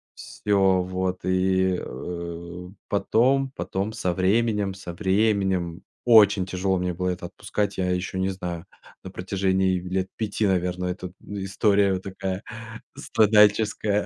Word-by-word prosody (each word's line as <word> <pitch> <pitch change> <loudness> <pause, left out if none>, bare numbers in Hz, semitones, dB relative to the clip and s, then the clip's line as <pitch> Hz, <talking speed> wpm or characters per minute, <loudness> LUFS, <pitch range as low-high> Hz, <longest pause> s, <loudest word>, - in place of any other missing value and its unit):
Всё 95 -3 +1
вот, 95 0 -3
и, 95 0 +2
э, 85 +4 -7 0.2
потом 130 +6 +2
потом 100 +3 -3
со 90 -4 -1
временем 105 +1 +1
со 90 -3 -8
временем, 95 -3 +1 0.2
очень 105 -5 +6
тяжело 95 0 0
мне 90 0 -1
было 90 +2 -2
это 90 -1 -4
отпускать, 100 +2 -3
я 90 -1 0
ещё 90 +1 -2
не 95 - +1
знаю, 90 -3 -5 0.4
на 95 - -8
протяжении 95 0 0
лет 95 +1 -2
5, 105 -1 -1
наверное, 90 -1 0
эта 90 -1 -8 0.2
история 100 -1 +1
такая 95 +1 -5 0.5
страдальческая. 105 -1 +3
95 Hz, 125 wpm, -25 LUFS, 90-100 Hz, 0.5 s, очень